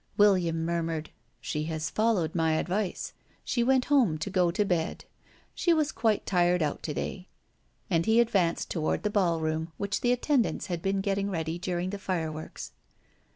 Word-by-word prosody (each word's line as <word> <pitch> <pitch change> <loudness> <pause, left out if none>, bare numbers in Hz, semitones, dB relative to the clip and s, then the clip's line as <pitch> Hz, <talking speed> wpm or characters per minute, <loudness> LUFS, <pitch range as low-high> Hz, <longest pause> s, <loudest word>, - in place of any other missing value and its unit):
William 180 -6 +3
murmured: 165 -2 -2 0.3
"She 150 -1 -3
has 155 -1 -3
followed 215 -8 +1
my 160 -2 +2
advice. 185 +4 -2 0.3
She 240 - 0
went 260 +1 +3
home 250 - +3
to 160 +6 -4
go 180 -2 +3
to 205 +4 +1
bed. 170 -4 -1 0.5
She 340 -2 +2
was 310 -1 +1
quite 220 -3 +1
tired 175 -2 +2
out 150 - -2
to 150 - -3
day." 185 -1 -4 0.6
And 170 -1 +1
he 220 +1 +5
advanced 195 -8 +1
toward 160 -3 -1
the 210 - 0
ballroom 165 -4 0
which 200 0 -2
the 245 - +2
attendants 250 0 +1
had 175 -3 -3
been 195 +1 0
getting 200 0 0
ready 165 -2 -3
during 180 +1 -2
the 200 - -5
fireworks. 160 -5 -4
180 Hz, 165 wpm, -28 LUFS, 165-205 Hz, 0.6 s, he